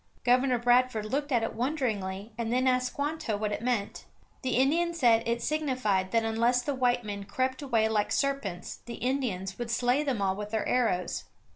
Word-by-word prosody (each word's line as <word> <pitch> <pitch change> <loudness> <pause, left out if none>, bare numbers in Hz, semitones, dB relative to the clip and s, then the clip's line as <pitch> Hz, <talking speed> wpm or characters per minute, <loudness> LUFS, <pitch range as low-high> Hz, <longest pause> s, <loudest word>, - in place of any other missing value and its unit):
Governor 250 +1 +3
Bradford 245 -2 +2
looked 285 +6 -2
at 235 -3 +2
it 225 - -2
wonderingly 220 -6 -2
and 230 0 -3
then 255 +2 +2
asked 255 0 +2
Squanto 290 -6 -2
what 210 0 -2
it 205 - -3
meant. 235 -4 -2 0.4
The 255 -1 -1
Indian 335 +6 +2
said 235 -7 +4
it 235 0 -1
signified 255 -11 0
that 230 +1 +1
unless 235 +3 +2
the 285 - -1
white 245 -2 +1
men 200 -1 -5
crept 260 +5 -1
away 235 -6 +2
like 215 -2 0
serpents 275 -11 -2
the 235 - -5
Indians 235 -8 -2
would 240 -1 -3
slay 245 +3 +2
them 270 -7 -1
all 190 -1 +1
with 210 +1 -5
their 220 0 -1
arrows. 215 -8 0
240 Hz, 185 wpm, -29 LUFS, 215-260 Hz, 0.4 s, said